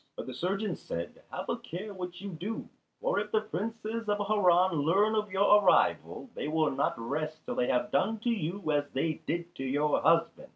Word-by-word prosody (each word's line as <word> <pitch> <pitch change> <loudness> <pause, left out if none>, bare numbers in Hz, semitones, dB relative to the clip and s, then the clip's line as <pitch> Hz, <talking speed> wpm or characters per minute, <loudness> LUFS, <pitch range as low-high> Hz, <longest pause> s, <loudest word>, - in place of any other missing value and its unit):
But - - -5
the 130 - -6
surgeon 190 - -1
said, 85 0 -6
"Have - - -5
a - - -1
care 200 +5 -6
what 180 -1 -6
you 200 - -5
do; 185 +7 -5 0.3
for - - +1
if - - -4
the 215 - +3
Princes 220 +3 -4
of 205 - +2
Harran 185 -3 +4
learn 195 +8 +3
of 210 -2 0
your 205 +2 +5
arrival, - - +2
they - - -4
will 155 0 +2
not 135 +1 0
rest 155 +7 -4
till - - -3
they 125 - 0
have 125 0 +1
done 195 +5 +2
to 240 - 0
you 180 -4 -2
as 145 -1 +1
they 155 +3 -1
did 170 0 -2
to - - -4
your 145 +3 +1
husband. 165 +1 +2
180 Hz, 205 wpm, -30 LUFS, 155-210 Hz, 0.3 s, your